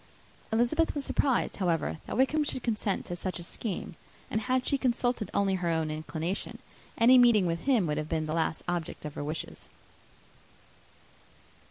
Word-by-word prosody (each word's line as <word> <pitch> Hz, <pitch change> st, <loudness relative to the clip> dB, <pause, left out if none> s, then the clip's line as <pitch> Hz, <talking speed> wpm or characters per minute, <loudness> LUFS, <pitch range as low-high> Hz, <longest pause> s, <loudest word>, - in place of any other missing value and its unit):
Elizabeth 245 Hz, +10 st, +2 dB
was 285 Hz, -2 st, -2 dB
surprised, 265 Hz, -4 st, +1 dB
however, 170 Hz, -4 st, 0 dB
that -, -, -3 dB
Wickham 290 Hz, +4 st, +3 dB
should 260 Hz, -3 st, -3 dB
consent 210 Hz, -4 st, -1 dB
to 175 Hz, -, -4 dB
such 185 Hz, +1 st, -4 dB
a 175 Hz, -, -7 dB
scheme; 190 Hz, +2 st, -4 dB, 0.4 s
and, 220 Hz, -, 0 dB
had 255 Hz, +2 st, 0 dB
she 280 Hz, -, +2 dB
consulted 245 Hz, -4 st, 0 dB
only 195 Hz, -1 st, +2 dB
her 180 Hz, -2 st, 0 dB
own 160 Hz, -2 st, 0 dB
inclination, 160 Hz, +4 st, -4 dB, 0.4 s
any 250 Hz, +2 st, +7 dB
meeting 235 Hz, -6 st, +6 dB
with 170 Hz, -1 st, 0 dB
him 250 Hz, -9 st, +3 dB
would 150 Hz, -1 st, -1 dB
have 155 Hz, 0 st, -4 dB
been 160 Hz, -1 st, 0 dB
the 155 Hz, -, -3 dB
last 160 Hz, -1 st, 0 dB
object 175 Hz, -3 st, -3 dB
of 150 Hz, -, -5 dB
her -, -, -4 dB
wishes. 155 Hz, +2 st, -5 dB
195 Hz, 170 wpm, -29 LUFS, 165-245 Hz, 0.4 s, any